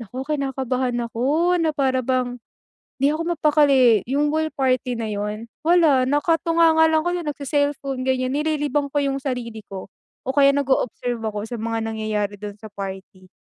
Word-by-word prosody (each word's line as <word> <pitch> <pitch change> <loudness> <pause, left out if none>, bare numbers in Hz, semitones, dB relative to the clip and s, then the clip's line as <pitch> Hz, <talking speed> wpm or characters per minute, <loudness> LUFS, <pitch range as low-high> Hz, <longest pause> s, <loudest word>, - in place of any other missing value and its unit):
naku 250 +4 -6
kinakabahan 260 -2 -2
ako 295 +10 +1
na 325 -1 +2
para 265 -2 +1
bang, 250 -1 -1 0.6
'di 280 +2 +3
ako 310 +2 -2 0.2
mapakali 275 - +4
yung 290 +3 +1
ball 315 0 0
party 255 -2 0
na 230 -1 -3
yun, 210 +2 -4 0.2
wala 315 -7 +4
nakatunganga 325 +2 +3
lang 315 0 +2
ko 350 - 0
dun 350 -3 -3
nag-ce-cellphone 285 -2 -2
ganyan 255 0 0
nililibang 295 -2 0
ko 290 - +1
yung 275 0 -1
sarili 245 -5 -4
ko 190 0 -8 0.4
o 265 - +1
kaya 280 -1 +6
nag-o-observe 250 -3 -1
ako 210 -1 -4
sa 240 - -5
mga 225 +1 -2
nangyayari 215 -2 -2
dun 205 0 -7
sa 220 -1 -11
party. 190 -1 -8
265 Hz, 160 wpm, -22 LUFS, 230-295 Hz, 0.6 s, kaya